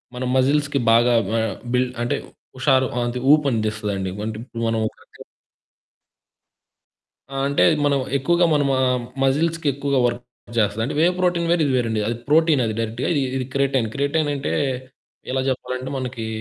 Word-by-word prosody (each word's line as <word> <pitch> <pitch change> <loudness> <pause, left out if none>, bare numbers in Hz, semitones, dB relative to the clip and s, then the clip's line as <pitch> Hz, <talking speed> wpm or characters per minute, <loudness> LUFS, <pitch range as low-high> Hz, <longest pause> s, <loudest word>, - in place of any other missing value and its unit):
మన 125 - -4
మజిల్స్‌కి 145 +2 +2
బాగా 120 +2 +5 0.3
ఆహ్, 110 -4 -1 0.2
బిల్డ్ 125 0 +1
అంటే 120 - 0 0.4
హుషారు 130 0 +3 0.2
అంతే 120 +1 -3
ఊపు 150 -1 +3
అందిస్తదండి. 105 -4 -2 0.2
అంటే 110 -1 -4
ఇప్పుడు 115 -2 -6
మనం 115 0 0
ఒక - - -9
రకంగ - - -20 2.1
ఆ! - - -6
అంటే 140 - +2 0.2
మనం 140 -1 +2 0.2
ఎక్కువగా 175 +6 +2
మన 145 - +3
మ - - +2 0.5
మజిల్స్‌కి 160 +4 +1
ఎక్కువగా 140 0 0
వర్క్ 120 0 -1 0.3
చేస్తది. 105 0 +1
అంటే 145 - -4
వేవ్ 175 +3 +4
ప్రోటీన్ 175 -2 +1
వేరు 175 -1 +2
ఇది 135 - 0
వేరండి. 115 -3 0
అది 115 - -1
ప్రోటీన్. 155 -2 +4
అది 110 - -2
డైరెక్ట్‌గా 115 +2 -2 0.3
ఇది 130 - -2
క్రిటైన్. 135 -4 +1
క్రిటైన్ 145 +2 0
అంటే, 140 0 -3 0.8
ఎలా 130 0 0
చెప్పాలంటే 130 0 -4
మనకి 125 -3 -4
130 Hz, 155 wpm, -22 LUFS, 115-145 Hz, 2.1 s, బాగా